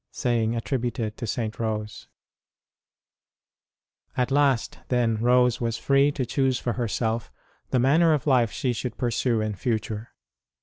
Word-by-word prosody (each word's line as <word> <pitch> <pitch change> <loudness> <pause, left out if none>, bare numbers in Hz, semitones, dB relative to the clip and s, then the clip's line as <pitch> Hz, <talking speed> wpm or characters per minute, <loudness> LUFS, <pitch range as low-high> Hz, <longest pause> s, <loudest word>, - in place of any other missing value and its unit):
(Saying 115 -2 0
attributed 115 -2 -2
to 120 - -5
St. 110 +1 -3
Rose.} 110 -2 -3 2.1
|jT 125 +1 +1
last, 135 -4 +2
then, 120 -3 +1
Rose 125 +1 +3
was 115 -1 -1
free 140 +1 +3
to 130 - -2
choose 130 +1 +1
for 120 -1 -2
herself 115 -1 -2 0.4
the - - +1
manner 155 +7 +4
of 145 - -4
life 125 -6 +3
she 125 -2 -1
should 120 0 -5
pursue 120 -1 0
in 110 0 -2
future. 110 +1 -3
120 Hz, 135 wpm, -25 LUFS, 115-130 Hz, 2.1 s, manner